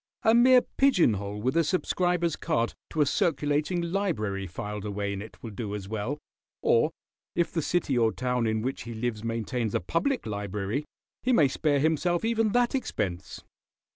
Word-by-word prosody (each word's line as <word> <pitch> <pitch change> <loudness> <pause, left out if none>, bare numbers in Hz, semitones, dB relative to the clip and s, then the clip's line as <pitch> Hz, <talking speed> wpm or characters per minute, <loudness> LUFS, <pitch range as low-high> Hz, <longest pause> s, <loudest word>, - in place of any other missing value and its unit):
A 225 - +5
mere 250 +1 +7
pigeon 260 - +5
hole 100 +1 -4
with 130 +7 0
a 165 - +4
subscriber's 175 0 +1
card 150 -8 0 0.2
to 155 - 0
a - - +5
circulating 150 +4 +1
library 160 - -1
filed 105 +3 -5
away 100 -1 -2
in 100 - -4
it 110 - -10
will 115 - -6
do 105 0 -4
as 100 -2 -6
well, 110 +7 -3 0.5
or 120 +7 +4 0.5
if 170 -1 +1
the 165 - -1
city 155 -4 0
or 115 -1 +3
town 125 -1 -1
in 110 0 0
which 130 +2 -2
he 115 -1 -7
lives 110 -1 -3
maintains 115 0 -2
a - - +3
public 170 - -1
library 105 +5 -3 0.4
he 255 - +1
may 155 - +5
spare 145 +2 +1
himself 165 +5 +1
even 225 -1 +2
that 245 +2 +2
expense." 95 - -3
130 Hz, 175 wpm, -28 LUFS, 105-175 Hz, 0.5 s, mere